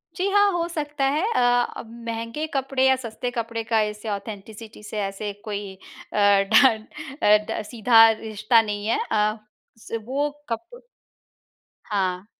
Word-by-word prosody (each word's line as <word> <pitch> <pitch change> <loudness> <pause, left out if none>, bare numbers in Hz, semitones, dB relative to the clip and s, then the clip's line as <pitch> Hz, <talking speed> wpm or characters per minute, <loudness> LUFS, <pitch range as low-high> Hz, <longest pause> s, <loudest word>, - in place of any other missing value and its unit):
जी 375 +1 -1
हाँ, 405 0 +4
हो 345 -2 -1
सकता 295 -3 -3
है। 300 +4 0
अ, - - +3 0.4
अब 220 - -9 0.2
महँगे 230 +7 -3
कपड़े 270 -1 0
या 265 - +5
सस्ते 245 0 -5
कपड़े 230 -1 -3
का 220 -1 +1
इससे 210 +1 -4
ऑथेंटिसिटी 210 +1 -7
से 210 0 -5
ऐसे 200 +1 -4
कोई 205 -2 -5 0.4
अ, - - -3 0.4
ढ 220 -5 +5 0.4
अ, 210 0 +7
ड - - -2
सीधा 225 -1 +6
रिश्ता 220 +1 +2
नहीं 210 -1 -4
है। 230 - +1
अ, 215 0 +2 0.4
स 225 - -15
वो 285 +4 -1 0.2
कप 345 - -6 1.1
हाँ। 185 -1 -1
225 Hz, 150 wpm, -24 LUFS, 210-265 Hz, 1.1 s, अ